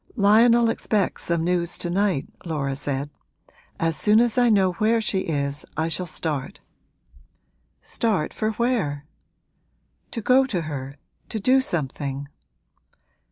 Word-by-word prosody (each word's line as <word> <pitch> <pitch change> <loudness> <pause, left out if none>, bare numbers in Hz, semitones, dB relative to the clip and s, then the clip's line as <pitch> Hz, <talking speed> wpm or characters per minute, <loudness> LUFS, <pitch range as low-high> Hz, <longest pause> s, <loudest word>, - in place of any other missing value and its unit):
'Lionel 230 +2 +5
expects 210 -3 0
some 170 -1 0
news 175 0 0
to 175 - -3
night,' 190 -6 0 0.2
Laura 145 -5 -2
said. 140 +1 -3 0.7
'As 165 -1 +1
soon 210 +5 +4
as 235 -1 +2
I 245 -1 +4
know 195 -4 +4
where 220 +5 +2
she 210 -3 0
is 140 -2 -2
I 160 +1 0
shall 180 +2 -2
start.' 155 +1 -4 1.2
'Start 210 -10 -1
for 220 0 -1
where?' 210 - -1 1.0
'To 230 - -5
go 260 +4 +5
to 185 -9 -1
her 140 -3 -6 0.3
to 220 - -3
do 260 +6 +4
something.' 140 - -3
180 Hz, 130 wpm, -24 LUFS, 150-220 Hz, 1.2 s, Lionel